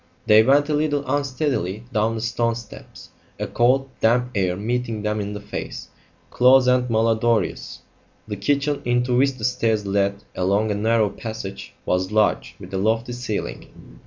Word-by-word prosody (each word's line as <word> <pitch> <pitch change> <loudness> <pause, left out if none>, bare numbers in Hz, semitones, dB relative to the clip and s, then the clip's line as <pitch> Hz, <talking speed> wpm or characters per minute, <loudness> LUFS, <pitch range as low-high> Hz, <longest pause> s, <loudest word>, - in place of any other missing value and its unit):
They 105 +1 +7
went 140 +5 +4
a 155 - -1
little 145 -1 0
unsteadily 130 - -1
down 110 +1 +1
the 110 - -4
stone 115 0 0
steps, 115 -2 -12 0.3
a - - -1
cold, 130 +3 +2
damp 125 +2 +2
air 95 -3 0
meeting 115 0 -2
them 105 0 -1
in 100 0 -4
the 105 - -5
face, 105 - -7 0.4
close 130 +1 +5
and 125 0 +2
mal 115 0 +2
odorous. 115 -2 0 0.5
The 105 - -4
kitchen, 140 +7 0
into 120 0 +1
which 135 +2 +3
the 115 -4 -5
stairs 110 -4 0
led 100 0 0
along 100 +4 +1
a - - +1
narrow 110 0 +1
passage, 110 -2 -7
was 90 +2 0
large, 105 -1 +1
with - - -11
a 95 - -1
lofty 115 +4 0
ceiling. 105 - -6
115 Hz, 165 wpm, -22 LUFS, 105-125 Hz, 0.5 s, They